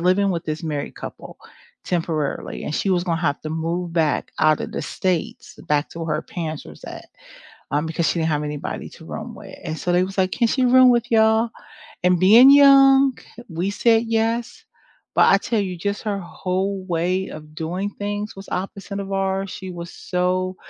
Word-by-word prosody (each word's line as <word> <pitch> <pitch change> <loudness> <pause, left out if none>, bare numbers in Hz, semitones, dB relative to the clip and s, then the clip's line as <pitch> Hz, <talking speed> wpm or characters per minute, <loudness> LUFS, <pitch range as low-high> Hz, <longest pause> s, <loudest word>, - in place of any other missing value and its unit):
living 185 +3 +2
with 170 -2 -3
this 155 +2 -4
married 150 -3 -4
couple - - -9 0.5
temporarily, 165 -5 -2
and 150 - -3
she 195 - 0
was 180 -1 +1
gonna 165 -2 -1
have 145 -4 0
to 155 - -6
move 165 +2 -3
back 160 -3 0
out 155 -1 +3
of - - -4
the - - -3
States, 180 -4 -3
back 150 0 +1
to - - -10
where 160 -2 -1
her - - -2
parents 160 -4 -6
was - - -13
at, - - -9 0.6
um, 150 +3 0
because 160 +1 -1
she - - -1
didn't 160 0 0
have 150 -1 0
anybody 150 -1 -5
to 160 - -14
room 230 +7 -7
with, 200 -1 -11
and 160 -2 -4
so 180 - -2
they 180 +1 +3
was, 190 +1 -6
like, 185 -1 +2
"Can 235 +3 +1
she 255 +2 +1
room 255 0 +7
with 240 -1 +1
y'all?" 220 +1 +3 0.5
and 180 -1 +3
being 230 +8 +8
young, 275 -1 +6 0.3
we 175 +2 -2
said, 225 +2 +3
"Yes." 225 +1 -1 0.5
but - - +6
I - - +5
tell 225 -3 -1
you 185 -3 -3
just 200 +4 -3
her 205 -3 -2
whole 190 +2 -3
way 180 +2 -1
of 155 0 -11
doing 175 +5 -3
things 205 +1 -4
was 195 - -10
opposite 195 +2 -4
of 195 0 -6
ours, 195 0 -1
she 190 -2 -7
was 170 -1 -8
so 185 +1 -1
185 Hz, 195 wpm, -22 LUFS, 165-205 Hz, 0.6 s, being